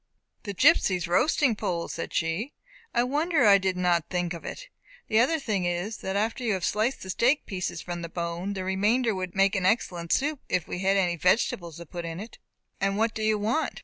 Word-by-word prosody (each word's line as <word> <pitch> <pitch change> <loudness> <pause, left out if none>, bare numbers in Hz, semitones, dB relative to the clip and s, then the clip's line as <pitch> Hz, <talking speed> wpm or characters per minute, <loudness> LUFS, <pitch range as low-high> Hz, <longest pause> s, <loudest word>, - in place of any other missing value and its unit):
"The 200 -2 -4
gipsies' 190 - +4
roasting 255 - +3
pole!" 170 -4 -2
said - - -5
she; 165 - -1 0.4
"I 240 - +2
wonder 295 +2 +1
I 200 -1 +7
did 190 -1 -1
not 175 -2 +1
think 180 -1 -1
of 170 - -8
it. - - -7 0.4
The 220 - +4
other 270 +8 +3
thing 205 -9 -1
is, 175 +5 -2
that 190 0 -4
after 225 +5 -1
you 225 -3 +1
have 185 -2 -1
sliced 220 +6 0
the 190 - -4
steak 255 +9 +2
pieces 180 -4 -4
from 175 -1 -5
the 170 - -6
bone, 170 +3 -3
the 190 -2 -4
remainder 210 +5 +1
would 185 -1 -5
make 195 +1 +3
an 185 -2 +1
excellent 175 -6 0
soup, 290 +1 +1
if 180 - 0
we - - -4
had 195 +1 +2
any 175 -3 +1
vegetables 175 -2 +1
to 170 - -9
put 175 +2 -7
with 165 +1 -5
it." 220 +4 -9 0.4
"And 195 0 0
what 225 +1 +1
do 220 - -5
you 215 0 +2
want?" 225 +10 -1
195 Hz, 215 wpm, -27 LUFS, 175-225 Hz, 0.4 s, I